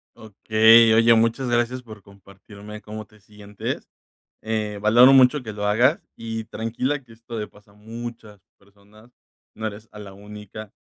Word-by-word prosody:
Okey. 110 Hz, +1 st, +4 dB
Oye, 115 Hz, +1 st, +5 dB
muchas 115 Hz, +3 st, +1 dB
gracias 120 Hz, +1 st, -1 dB
por 110 Hz, -3 st, -13 dB
compartirme 100 Hz, +2 st, -14 dB
cómo 110 Hz, 0 st, -9 dB
te 105 Hz, 0 st, -24 dB
sientes, 105 Hz, -1 st, -7 dB, 0.5 s
eh, 105 Hz, -2 st, -3 dB
valoro 120 Hz, +5 st, +6 dB
mucho 135 Hz, +1 st, +5 dB
que 110 Hz, -, -7 dB
lo 105 Hz, 0 st, -5 dB
hagas 130 Hz, -, +2 dB
y 115 Hz, -1 st, -6 dB
tranquila, 125 Hz, +6 st, -3 dB
que 120 Hz, -, -21 dB
esto 115 Hz, +1 st, -10 dB
le 105 Hz, -1 st, -4 dB
pasa 105 Hz, -1 st, -22 dB
a -, -, -24 dB
muchas 110 Hz, -1 st, -10 dB, 0.2 s
personas. 105 Hz, +3 st, -23 dB, 0.4 s
No 110 Hz, 0 st, -5 dB
eres 105 Hz, +1 st, -10 dB
a 105 Hz, -, -12 dB
la 100 Hz, -2 st, -11 dB
única, 105 Hz, +1 st, -11 dB
110 Hz, 160 wpm, -22 LUFS, 105-115 Hz, 0.5 s, valoro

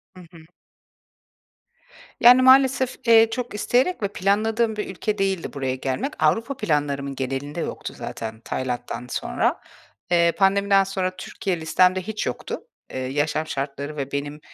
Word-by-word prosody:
Hı 185 Hz, -, -12 dB
hı. 165 Hz, -2 st, -15 dB, 1.7 s
Yani, 250 Hz, +1 st, +8 dB
maalesef, 260 Hz, 0 st, +5 dB
eee, 225 Hz, -1 st, +7 dB
çok 245 Hz, 0 st, -4 dB
isteyerek 245 Hz, -, +1 dB
ve -, -, +2 dB
planladığım 215 Hz, +4 st, 0 dB
bir 210 Hz, -, -4 dB
ülke 210 Hz, +3 st, -3 dB
değildi 195 Hz, -3 st, -1 dB
buraya 130 Hz, -2 st, -2 dB
gelmek. 135 Hz, -, -3 dB
Avrupa 240 Hz, +4 st, +1 dB
planlarımın 140 Hz, -, -1 dB
genelinde 135 Hz, +4 st, -4 dB
yoktu -, -, -5 dB
zaten 110 Hz, -1 st, -6 dB
Tayland'dan 125 Hz, 0 st, -4 dB
sonra. -, -, -1 dB, 0.5 s
Eee, 170 Hz, -1 st, +4 dB
pandemiden 195 Hz, 0 st, +4 dB
sonra 190 Hz, -1 st, -2 dB
Türkiye 185 Hz, -1 st, -3 dB
listemde 180 Hz, +3 st, +3 dB
hiç 215 Hz, +3 st, -4 dB
yoktu. 125 Hz, -, -4 dB, 0.3 s
Eee, -, -, -3 dB
yaşam 145 Hz, +4 st, -1 dB
şartları 140 Hz, +2 st, -4 dB
ve 140 Hz, -1 st, -4 dB
benim, 145 Hz, +1 st, -4 dB
180 Hz, 135 wpm, -23 LUFS, 140-215 Hz, 1.7 s, Yani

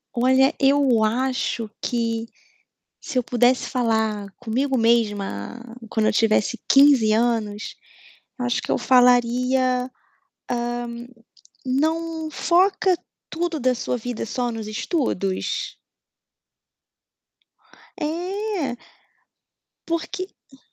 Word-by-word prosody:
Olha, 260 Hz, +3 st, +4 dB
eu 270 Hz, -5 st, +4 dB
acho 245 Hz, 0 st, -1 dB
que, 230 Hz, -2 st, -1 dB, 0.7 s
se 280 Hz, -, -5 dB
eu -, -, -1 dB
pudesse 245 Hz, +1 st, +2 dB
falar 220 Hz, -4 st, 0 dB
comigo 255 Hz, +3 st, -1 dB
mesma 220 Hz, -, 0 dB, 0.3 s
quando 220 Hz, -1 st, 0 dB
eu -, -, +2 dB
tivesse 220 Hz, +1 st, +2 dB
15 275 Hz, -6 st, +6 dB
anos, 220 Hz, -2 st, 0 dB, 0.6 s
acho 245 Hz, -1 st, 0 dB
que -, -, -4 dB
eu -, -, +2 dB
falaria, 250 Hz, 0 st, +4 dB, 0.3 s
hã: 255 Hz, -, -12 dB, 1.7 s
"Não 320 Hz, +4 st, -1 dB
foca 370 Hz, +3 st, +2 dB, 0.3 s
tudo 330 Hz, -1 st, -2 dB
da 255 Hz, -1 st, +2 dB
sua 250 Hz, -, -2 dB
vida 240 Hz, -1 st, -4 dB
só 245 Hz, +2 st, -2 dB
nos 225 Hz, -1 st, -5 dB
estudos". 215 Hz, -, -2 dB, 2.2 s
É. 355 Hz, -, -2 dB, 1.1 s
Porque, 335 Hz, +3 st, -3 dB, 0.2 s
hum 270 Hz, -, -19 dB
250 Hz, 95 wpm, -23 LUFS, 225-285 Hz, 2.2 s, 15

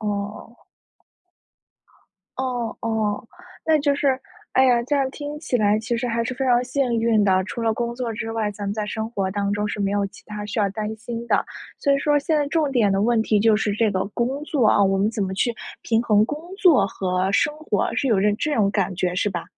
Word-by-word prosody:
哦。 210 Hz, +2 st, -5 dB, 1.7 s
哦， 245 Hz, -3 st, -2 dB
哦， 220 Hz, 0 st, -1 dB, 0.4 s
那 315 Hz, -1 st, +4 dB
就 285 Hz, 0 st, +2 dB
是 275 Hz, -2 st, +1 dB, 0.3 s
哎 265 Hz, -, +5 dB
呀， 245 Hz, -2 st, +4 dB
这 290 Hz, +3 st, 0 dB
样 270 Hz, -1 st, +1 dB
听 290 Hz, +2 st, -6 dB
起 300 Hz, -5 st, -1 dB
来 210 Hz, -1 st, +3 dB
其 230 Hz, +2 st, -2 dB
实 245 Hz, +1 st, -2 dB
还 230 Hz, 0 st, 0 dB
是 240 Hz, -, -3 dB
非 265 Hz, -, -2 dB
常 245 Hz, 0 st, +4 dB
幸 255 Hz, -2 st, 0 dB
运 225 Hz, -2 st, +3 dB
的。 190 Hz, -1 st, +3 dB
除 235 Hz, -, -6 dB
了 225 Hz, -1 st, +1 dB
工 235 Hz, 0 st, -2 dB
作 240 Hz, -2 st, -3 dB
之 225 Hz, +1 st, -4 dB
外， 220 Hz, -2 st, -1 dB
咱 205 Hz, 0 st, -7 dB
们 200 Hz, -, -1 dB
在 210 Hz, 0 st, -3 dB
生 220 Hz, +1 st, -4 dB
活 195 Hz, -4 st, -2 dB
当 200 Hz, 0 st, -1 dB
中 210 Hz, 0 st, -1 dB
是 205 Hz, -, -4 dB
没 200 Hz, 0 st, +1 dB
有 200 Hz, -1 st, 0 dB
其 -, -, -14 dB
它 210 Hz, 0 st, -6 dB
需 225 Hz, +3 st, -4 dB
要 205 Hz, -2 st, +2 dB
担 215 Hz, +2 st, -4 dB
心 230 Hz, +1 st, -6 dB
的， -, -, +2 dB, 0.3 s
所 280 Hz, -, +2 dB
以 275 Hz, -, +3 dB
说 290 Hz, +1 st, +2 dB
现 310 Hz, +2 st, 0 dB
在 290 Hz, -1 st, +1 dB
重 310 Hz, -1 st, +1 dB
点 225 Hz, -6 st, +3 dB
的 195 Hz, +1 st, +1 dB
问 235 Hz, 0 st, +3 dB
题 215 Hz, -1 st, +2 dB
就 220 Hz, +1 st, +4 dB
是 210 Hz, -1 st, 0 dB
这 215 Hz, +1 st, +1 dB
个 185 Hz, -1 st, -1 dB
工 260 Hz, +4 st, -1 dB
作， 285 Hz, -7 st, +1 dB
啊， 205 Hz, -, +4 dB
我 195 Hz, 0 st, +3 dB
们 200 Hz, +3 st, +1 dB
怎 225 Hz, -2 st, -2 dB
么 190 Hz, 0 st, -2 dB
去 235 Hz, +4 st, 0 dB, 0.3 s
平 225 Hz, 0 st, +1 dB
衡 210 Hz, -2 st, +4 dB
工 295 Hz, +5 st, -4 dB, 0.2 s
作 355 Hz, -9 st, +5 dB
和 185 Hz, -1 st, -1 dB
生 295 Hz, +7 st, +2 dB
活， 310 Hz, -, -1 dB
是 275 Hz, -, 0 dB
有 220 Hz, -5 st, +3 dB
点 205 Hz, +1 st, +3 dB
这 305 Hz, -, -1 dB
这 -, -, 0 dB
种 200 Hz, -2 st, +3 dB
感 195 Hz, -2 st, -1 dB
觉 180 Hz, 0 st, -1 dB
是 185 Hz, -, +1 dB
吧？ 175 Hz, -3 st, -4 dB
225 Hz, 255 characters per minute, -23 LUFS, 205-255 Hz, 1.7 s, 哎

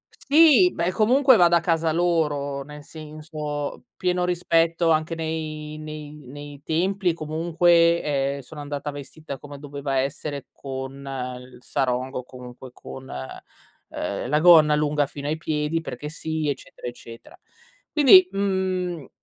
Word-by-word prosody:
Sì, 320 Hz, +4 st, +5 dB
beh, 175 Hz, +2 st, 0 dB
comunque 255 Hz, +6 st, +5 dB
vado 175 Hz, -1 st, +5 dB
a -, -, +5 dB
casa 165 Hz, -1 st, +1 dB
loro, 150 Hz, -5 st, 0 dB
nel 150 Hz, +1 st, -11 dB
senso, 150 Hz, -2 st, -6 dB
pieno 180 Hz, -1 st, 0 dB
rispetto 165 Hz, -1 st, +1 dB
anche 160 Hz, +1 st, +1 dB
nei 155 Hz, -1 st, -4 dB
nei 155 Hz, -1 st, -8 dB, 0.2 s
nei 145 Hz, +1 st, -10 dB
templi 185 Hz, +4 st, 0 dB
e -, -, +1 dB
comunque, 170 Hz, +2 st, +2 dB
ehm, 140 Hz, -1 st, -1 dB
sono 150 Hz, +4 st, -11 dB
andata 145 Hz, 0 st, -4 dB
vestita 145 Hz, 0 st, -8 dB
come 145 Hz, -1 st, -10 dB
doveva 140 Hz, -1 st, -4 dB
essere 140 Hz, 0 st, -4 dB
con 135 Hz, 0 st, -7 dB, 0.4 s
il 125 Hz, 0 st, -14 dB
sarong 130 Hz, -1 st, -1 dB
o 125 Hz, -, -3 dB
comunque 125 Hz, 0 st, -11 dB
con, 130 Hz, 0 st, -10 dB
ehm, 65 Hz, -, -7 dB
la 150 Hz, +1 st, +3 dB
gonna 155 Hz, -4 st, +7 dB
lunga 150 Hz, -1 st, +1 dB
fino 140 Hz, +1 st, -7 dB
ai 155 Hz, +1 st, -1 dB
piedi 155 Hz, 0 st, -1 dB
perché 150 Hz, 0 st, -6 dB
sì, 160 Hz, -1 st, -3 dB
eccetera, 135 Hz, -2 st, -6 dB
eccetera. 115 Hz, -1 st, -11 dB, 0.5 s
Quindi, 350 Hz, +5 st, +7 dB
mhmm, 185 Hz, -5 st, -1 dB
155 Hz, 135 wpm, -24 LUFS, 140-170 Hz, 0.5 s, gonna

